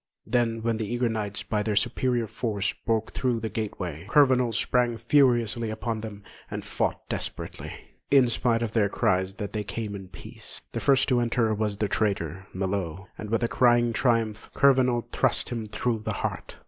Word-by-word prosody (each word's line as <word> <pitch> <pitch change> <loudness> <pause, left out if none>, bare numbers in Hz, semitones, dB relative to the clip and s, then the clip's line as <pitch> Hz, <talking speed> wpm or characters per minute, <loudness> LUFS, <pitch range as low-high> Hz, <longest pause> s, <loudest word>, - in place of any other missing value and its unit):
Then 115 -1 0
when 115 -1 +1
the 110 0 -3
eager 120 0 +1
knights, 105 -3 -3
by 105 -1 -1
their 105 0 -1
superior 120 +3 +1
force, 105 -2 -2
broke 110 -1 +1
through 125 -3 0
the 110 0 -3
gateway, 90 -7 -4
Kurvenal 130 -4 +4
sprang 120 +1 +1
furiously 120 -2 +3
upon 110 0 -3
them 105 -2 -8 0.3
and - - -5
fought - - -2
desperately, - - -5 0.4
in 135 -2 +6
spite 120 0 +1
of 115 - -2
their 110 -3 +2
cries 95 0 +1
that 105 -2 -5
they 105 -1 -1
came 105 +1 -4
in 95 -1 -8
peace. 95 0 -9
The - - -3
first 135 -1 +3
to 125 -2 +3
enter 115 -2 +1
was 105 -1 -1
the 105 - 0
traitor, 95 -3 -1
Melot, 95 -2 -2
and 105 - -7
with 115 +2 +1
a - - +3
cry 120 0 +4
of 120 -1 +1
triumph, 115 -3 0
Kurvenal 130 -3 +4
thrust - - +1
him 115 -3 -4
through 110 +2 -1
the 105 - -3
heart. - - -4
115 Hz, 185 wpm, -27 LUFS, 105-120 Hz, 0.4 s, in